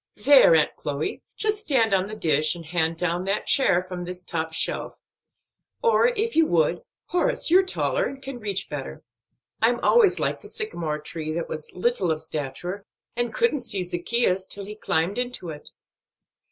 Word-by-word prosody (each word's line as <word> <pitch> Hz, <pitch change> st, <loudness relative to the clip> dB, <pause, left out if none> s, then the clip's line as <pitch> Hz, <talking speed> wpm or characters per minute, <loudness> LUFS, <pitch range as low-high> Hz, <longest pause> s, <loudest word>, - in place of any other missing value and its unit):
"There, 275 Hz, -, +8 dB
Aunt 155 Hz, -, +2 dB
Chloe, 145 Hz, +1 st, -3 dB, 0.2 s
just 425 Hz, -1 st, 0 dB
stand 240 Hz, -, +2 dB
on 190 Hz, 0 st, +2 dB
the 215 Hz, -, -7 dB
dish, 155 Hz, -4 st, +2 dB
and 170 Hz, -1 st, -10 dB
hand 165 Hz, 0 st, 0 dB
down 175 Hz, +1 st, 0 dB
that 200 Hz, +2 st, 0 dB
chair 180 Hz, -10 st, +3 dB
from 180 Hz, -1 st, -6 dB
this 180 Hz, +1 st, -6 dB
top 160 Hz, -2 st, -3 dB
shelf. 160 Hz, -, -1 dB, 0.9 s
Or, 465 Hz, 0 st, +4 dB
if 460 Hz, -1 st, 0 dB
you 325 Hz, -1 st, +4 dB
would, 170 Hz, +1 st, +1 dB, 0.3 s
Horace, 360 Hz, +1 st, +1 dB
you're 370 Hz, +2 st, +7 dB
taller, -, -, 0 dB
and 275 Hz, -, -8 dB
can 270 Hz, -2 st, -7 dB
reach 200 Hz, -3 st, -3 dB
better. 145 Hz, -3 st, -6 dB, 0.6 s
I'm 235 Hz, +2 st, +3 dB
always 450 Hz, -5 st, +4 dB
like -, -, -1 dB
the -, -, -12 dB
sycamore 170 Hz, -, -3 dB
tree 155 Hz, +1 st, -5 dB
that 170 Hz, +1 st, -3 dB
was 155 Hz, -1 st, -7 dB
little 190 Hz, -1 st, +1 dB
of 160 Hz, -1 st, 0 dB
stature, 160 Hz, +8 st, -5 dB, 0.3 s
and 240 Hz, -1 st, -1 dB
couldn't 465 Hz, -11 st, +1 dB
see 215 Hz, -7 st, -2 dB
Zaccheus 185 Hz, +2 st, 0 dB
till 200 Hz, -1 st, -7 dB
he 210 Hz, +1 st, -8 dB
climbed 185 Hz, +1 st, -1 dB
into 245 Hz, -8 st, -3 dB
it." 150 Hz, -2 st, -8 dB
190 Hz, 175 wpm, -24 LUFS, 165-260 Hz, 0.9 s, There